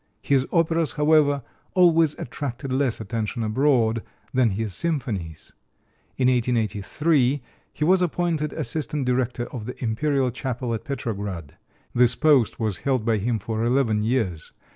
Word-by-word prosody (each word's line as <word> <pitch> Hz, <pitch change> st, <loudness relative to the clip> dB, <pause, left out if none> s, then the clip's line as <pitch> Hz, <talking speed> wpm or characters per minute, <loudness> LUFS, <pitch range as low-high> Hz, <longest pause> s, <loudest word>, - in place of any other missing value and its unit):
His 135 Hz, -2 st, +2 dB
operas, 165 Hz, -4 st, +1 dB
however, 150 Hz, -2 st, +3 dB, 0.3 s
always 165 Hz, -4 st, +4 dB
attracted 135 Hz, +1 st, -5 dB
less 130 Hz, -3 st, 0 dB
attention 110 Hz, +2 st, -3 dB
abroad 115 Hz, -1 st, +2 dB, 0.3 s
than 130 Hz, -3 st, +3 dB
his 105 Hz, 0 st, -3 dB
symphonies. 105 Hz, -, -3 dB, 0.6 s
In 130 Hz, -, +3 dB
1883 125 Hz, -, +1 dB, 0.3 s
he 150 Hz, -, -4 dB
was 185 Hz, +2 st, +4 dB
appointed 170 Hz, -3 st, 0 dB
assistant 150 Hz, -2 st, -2 dB
director 125 Hz, -1 st, 0 dB
of 115 Hz, -3 st, -6 dB
the 125 Hz, -, -5 dB
Imperial 130 Hz, +3 st, +1 dB
Chapel 125 Hz, -1 st, -3 dB
at 110 Hz, -, -4 dB
Petrograd. 100 Hz, -, -4 dB, 0.4 s
This 120 Hz, -1 st, +4 dB
post 145 Hz, -8 st, +3 dB
was 110 Hz, -5 st, -1 dB
held 130 Hz, -2 st, -1 dB
by 115 Hz, -2 st, +2 dB
him 115 Hz, +3 st, 0 dB
for 110 Hz, +2 st, -3 dB
eleven 120 Hz, -3 st, +2 dB
years. 105 Hz, -8 st, -1 dB
125 Hz, 135 wpm, -24 LUFS, 110-145 Hz, 0.6 s, always